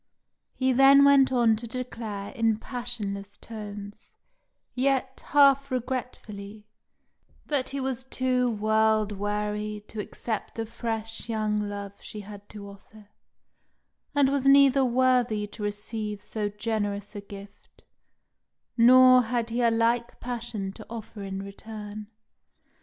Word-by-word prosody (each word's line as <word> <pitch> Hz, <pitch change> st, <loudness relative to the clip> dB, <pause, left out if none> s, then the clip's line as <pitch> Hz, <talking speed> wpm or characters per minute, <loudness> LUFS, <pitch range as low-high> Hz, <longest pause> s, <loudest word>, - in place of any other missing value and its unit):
He 260 Hz, 0 st, +1 dB
then 270 Hz, +2 st, +7 dB
went 275 Hz, -2 st, +6 dB
on 235 Hz, -3 st, +4 dB
to 235 Hz, +2 st, -5 dB
declare 225 Hz, -4 st, -5 dB
in 225 Hz, -4 st, +1 dB
passionless 210 Hz, -5 st, -5 dB
tones, 205 Hz, -2 st, -9 dB, 0.6 s
yet 265 Hz, 0 st, 0 dB
half 275 Hz, -1 st, +5 dB
regretfully, 220 Hz, -5 st, -5 dB, 0.8 s
that 280 Hz, -4 st, -1 dB
he 275 Hz, -, -4 dB
was 265 Hz, -2 st, -2 dB
too 255 Hz, -1 st, 0 dB
world 215 Hz, -1 st, +2 dB
weary 210 Hz, +1 st, -3 dB
to 220 Hz, -, -7 dB
accept 215 Hz, +1 st, -4 dB
the 225 Hz, -, -3 dB
fresh 225 Hz, 0 st, -5 dB
young 210 Hz, -2 st, -1 dB
love 200 Hz, -1 st, -7 dB
she 210 Hz, -, -8 dB
had 205 Hz, 0 st, -12 dB
to 205 Hz, -1 st, -9 dB
offer, 205 Hz, +1 st, -15 dB, 1.1 s
and 280 Hz, -2 st, +4 dB
was 275 Hz, -1 st, 0 dB
neither 275 Hz, -1 st, +6 dB
worthy 250 Hz, -4 st, +2 dB
to 210 Hz, +1 st, -11 dB
receive 210 Hz, 0 st, -3 dB
so 210 Hz, 0 st, -3 dB
generous 205 Hz, -1 st, -3 dB
a 205 Hz, -, -5 dB
gift, 200 Hz, 0 st, -13 dB, 0.9 s
nor 255 Hz, +1 st, +7 dB
had 235 Hz, 0 st, -2 dB
he 240 Hz, +2 st, 0 dB
a 235 Hz, -, +4 dB
like 230 Hz, +1 st, 0 dB
passion 235 Hz, -5 st, -4 dB
to -, -, -11 dB
offer 220 Hz, -2 st, -8 dB
in 195 Hz, 0 st, -5 dB
return. 210 Hz, +1 st, -8 dB
225 Hz, 125 wpm, -27 LUFS, 205-250 Hz, 1.1 s, then